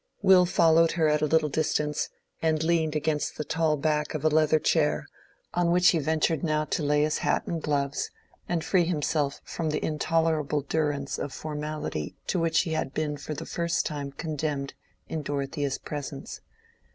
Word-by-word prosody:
Will 185 -2 +6
followed 165 -1 +4
her 160 -2 +2
at 150 0 +2
a 155 - +2
little 160 0 +3
distance, 150 0 0 0.3
and 160 -1 +1
leaned 160 -2 +1
against 150 0 -1
the - - -2
tall 160 0 +1
back 150 +1 0
of 155 0 -3
a - - +6
leather 155 0 +4
chair, 155 -1 +1 0.5
on 175 -1 +2
which 180 +1 +5
he 165 - +3
ventured 160 0 +1
now 155 -2 +1
to 155 - -1
lay 150 0 +2
his 155 0 0
hat - - 0
and 165 -2 -3
gloves, 140 -2 -1 0.4
and 170 -2 0
free 180 -3 +3
himself 150 -3 -1
from 160 -2 -3
the 150 - -1
intolerable 155 -1 +1
durance 145 -1 -1
of 145 - -3
formality 150 - -4
to 185 - 0
which 165 -1 +3
he 170 - -4
had 155 -3 -2
been 150 -1 -1
for 150 +1 -6
the 165 +3 -6
first 170 0 -1
time 145 -2 -4
condemned 150 -2 -3 0.3
in 160 - -3
Dorothea's 140 0 -2
presence. 145 -1 -6
155 Hz, 175 wpm, -27 LUFS, 150-160 Hz, 0.5 s, Will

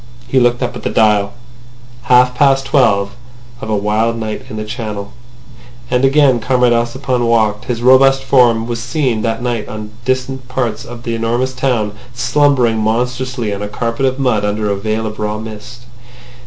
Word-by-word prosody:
He 135 - +2
looked 120 0 +2
up 120 - -3
at - - -7
the - - -2
dial.... 105 -2 +2 0.7
Half 125 0 +4
past 135 0 +3
twelve 110 -8 +2 0.5
of 110 - -6
a 110 - +1
wild 105 +3 0
night 110 -1 -5
in - - -7
the 110 - -4
Channel. 105 -3 -6 0.8
And 125 +1 +1
again 135 -2 +4
Comrade 125 +1 +2
Ossipon 120 +1 -1
walked. 110 -2 +1
His 120 -1 -3
robust 135 +1 +5
form 120 -4 +3
was 115 -1 -4
seen 125 -3 -1
that 115 +1 -2
night 120 -3 -2
in 110 -1 -7
distant 130 0 -2
parts 125 -4 -3
of 120 0 -10
the 115 - -3
enormous 120 +3 -1
town 125 -5 0 0.2
slumbering 125 -2 +2
monstrously 120 +1 -1
on 100 - -5
a 105 - -3
carpet 115 +4 -2
of 130 0 -2
mud 125 -6 +1
under 105 0 -1
a - - 0
veil 110 +2 -2
of 110 0 -6
raw 105 0 -2
mist. 110 +3 -9
120 Hz, 175 wpm, -15 LUFS, 110-130 Hz, 0.8 s, robust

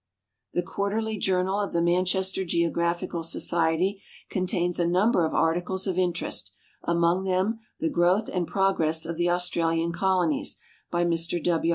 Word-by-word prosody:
The 175 - 0
Quarterly 210 +3 -2
Journal 190 +1 +1
of 205 - -2
the 170 - +2
Manchester 185 +2 +1
Geographical 170 0 -1
Society 170 +4 +1 0.3
contains 180 -2 -1
a 170 - +2
number 180 0 +3
of - - -5
articles 175 +3 +1
of 185 -2 -1
interest, 175 -2 -1 0.3
among 170 +2 +1
them 190 +4 0 0.2
'^The 160 - 0
Growth 175 +5 +2
and 180 -3 -2
Progress 165 -5 +1
of 165 0 -4
the 175 0 +1
Australian 170 -1 +1
Colonies," 180 -2 0 0.3
by 175 0 +1
Mr 170 -1 0
W. 165 -1 +1
175 Hz, 145 wpm, -26 LUFS, 170-190 Hz, 0.3 s, number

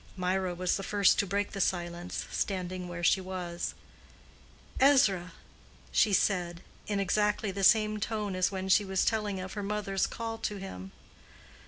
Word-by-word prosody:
Mirah 185 0 -1
was 180 +1 0
the - - -5
first 200 -1 +3
to 200 - +1
break 200 +2 -1
the 195 - -3
silence, 175 -1 -2
standing 185 -2 -3
where 175 0 -6
she 190 - +4
was. 180 -2 -4 1.0
"Ezra," 215 -11 +4 0.6
she 215 - +3
said, 180 -3 +1 0.2
in 205 -1 -1
exactly 210 +1 +1
the 195 +1 -4
same 215 +1 +4
tone 210 -2 -2
as 185 +1 +1
when 190 -1 -4
she 190 +2 +5
was 190 -1 0
telling 210 -3 0
of 185 0 -6
her 205 - -4
mother's 200 -1 -1
call 225 -1 -5
to 210 -2 -3
him. 95 - -8
195 Hz, 160 wpm, -30 LUFS, 180-210 Hz, 1.0 s, she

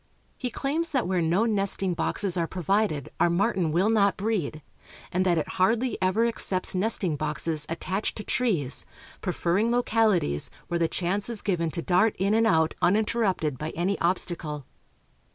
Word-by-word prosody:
He 250 - -3
claims 305 +7 -1
that 265 -5 0
where 185 -1 +1
no 170 +7 +2
nesting 195 -4 +1
boxes 185 +2 0
are 170 -2 0
provided 185 -4 0
our - - +4
martin 185 -2 +1
will 185 +7 +2
not 200 -4 +3
breed, 190 -8 -2 0.5
and 185 +1 +1
that 175 -2 +3
it 155 - -1
hardly 230 +7 +1
ever 190 +5 +2
accepts 195 -5 0
nesting 185 -4 0
boxes 155 +1 -2
attached 185 +5 -2
to 210 - -5
trees, 180 - 0 0.4
preferring 185 +4 0
localities 220 - +1 0.2
where 170 - 0
the 165 - +2
chance 190 +6 -1
is 230 -3 -4
given 170 -5 0
to 170 +1 -5
dart 195 +4 +3
in 195 +3 +1
and 225 +1 +3
out 160 -5 +3
uninterrupted 195 - +1
by 155 - -3
any 180 +4 0
obstacle. 170 -5 -2
185 Hz, 160 wpm, -26 LUFS, 170-220 Hz, 0.5 s, our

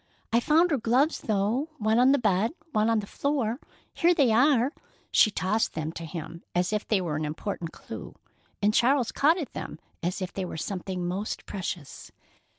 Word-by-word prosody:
I 235 - +6
found 325 +7 +3
her 285 - +2
gloves, 255 +8 +2
though—one 220 +3 0
on 255 +2 +6
the 280 - +5
bed, 220 - +1
and 325 - -33
one 215 0 +3
on 225 -2 +2
the - - -7
floor. 260 -1 -1 0.3
Here 345 +1 +3
they 275 -8 +4
are." 255 +3 +4 0.4
She - - +6
tossed 210 +2 0
them 160 0 -2
to 165 0 -7
him 165 0 -7
as 180 +3 +1
if 210 - -1
they 210 - +2
were 160 -4 -2
an 155 - -2
important 160 +2 -4
clue, - - -9 0.5
and 210 +1 +4
Charles 245 0 +3
caught 315 +5 +3
at 315 -7 -5
them - - -6 0.2
as 175 +3 -2
if 185 -1 -4
they 195 - -3
were 175 - -5
something 185 +1 -4
most 195 +4 -3
precious. 175 -7 -6
215 Hz, 190 wpm, -27 LUFS, 180-265 Hz, 0.5 s, I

